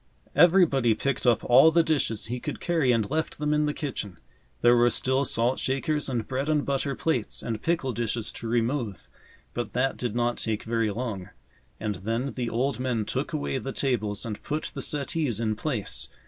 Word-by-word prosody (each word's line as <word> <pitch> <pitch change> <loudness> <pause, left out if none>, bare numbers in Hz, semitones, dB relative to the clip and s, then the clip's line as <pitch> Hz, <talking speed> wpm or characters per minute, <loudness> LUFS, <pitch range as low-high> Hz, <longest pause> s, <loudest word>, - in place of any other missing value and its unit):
Everybody 155 - +5
picked 135 +2 -1
up 120 -2 +4
all 135 +6 +7
the 165 +1 +4
dishes 140 -9 0
he 125 +2 -3
could - - -5
carry 160 -7 +2
and 115 -4 +2
left 155 +1 -1
them 150 0 0
in 150 0 +2
the - - +1
kitchen. 120 - -5 0.4
There 120 0 +6
were 120 0 +5
still 130 +3 +1
salt 120 +1 +1
shakers 145 +3 -1
and 120 -4 -2
bread 135 +3 -2
and 150 -2 +2
butter 140 0 -1
plates 130 -9 -1
and 110 -2 -3
pickle 165 -6 0
dishes 115 -1 -2
to 115 - -7
remove, 115 -2 -1 0.5
but 120 -2 -4
that 135 +2 +1
did 120 -3 -3
not 120 0 +1
take 110 -2 -2
very 115 -1 0
long. 105 -4 -4 0.5
And 105 -2 -2
then 115 +8 -2
the 120 -2 -2
old 125 +4 0
men 125 -4 -1
took - - -2
away 70 -1 -2
the 135 - -5
tables 110 -7 -1
and 105 -3 -5
put 150 +1 -3
the - - -5
settees 145 -5 -1
in 110 -2 0
place. 115 -3 -3
125 Hz, 190 wpm, -27 LUFS, 115-140 Hz, 0.5 s, all